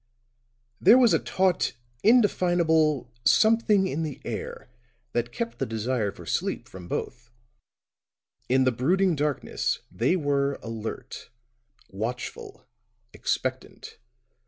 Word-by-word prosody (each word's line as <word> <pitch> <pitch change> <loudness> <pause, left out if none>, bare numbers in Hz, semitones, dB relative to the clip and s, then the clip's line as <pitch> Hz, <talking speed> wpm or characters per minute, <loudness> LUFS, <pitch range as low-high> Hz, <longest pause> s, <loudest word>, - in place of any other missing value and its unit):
There 240 - +7
was 240 -7 +5
a 165 - +4
taut, 185 -1 +1 0.3
indefinable 170 - +3
something 215 - +4
in 160 -3 -2
the 155 -4 -4
air - - -6 0.4
that 120 0 -1
kept 235 - -4
the 135 - 0
desire 110 -1 -1
for - - -13
sleep - - -2
from 90 -2 -11
both; 120 +5 -5 1.2
in 130 +1 +4
the 130 - +3
brooding 175 +9 +2
darkness 145 -1 -1
they 115 - +1
were 140 -4 0
alert, 115 -1 -7 0.6
watchful, 120 +4 -6 0.5
expectant. - - -4
145 Hz, 110 wpm, -26 LUFS, 120-185 Hz, 1.2 s, There